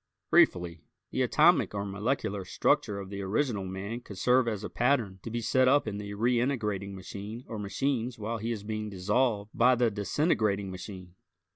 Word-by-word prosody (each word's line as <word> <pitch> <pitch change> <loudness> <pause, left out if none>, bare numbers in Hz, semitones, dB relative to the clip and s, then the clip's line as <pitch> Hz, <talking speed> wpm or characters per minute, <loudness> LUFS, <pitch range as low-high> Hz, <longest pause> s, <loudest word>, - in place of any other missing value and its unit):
Briefly, 85 -2 +3 0.3
the - - -1
atomic - - +4
or 100 0 -2
molecular 105 0 -2
structure 100 +2 +1
of 95 0 -8
the 100 0 -4
original 105 +1 -1
man 95 +5 -5
could 100 -5 -10
serve 125 +5 +3
as 110 -3 -2
a - - -4
pattern 120 -7 +1
to - - -6
be 120 +1 -3
set 130 +3 +3
up 140 -1 +4
in 100 -1 -3
the 100 0 -6
reintegrating 115 -4 0
machine 100 +5 -7
or 110 - -5
machines 120 +3 -1
while 110 +2 -3
he 115 +2 -2
is 105 -3 -4
being 110 0 -4
dissolved 105 +2 0
by 125 +2 +5
the 120 -2 +2
disintegrating 105 - 0
machine. 95 -1 -9
105 Hz, 175 wpm, -29 LUFS, 100-120 Hz, 0.3 s, by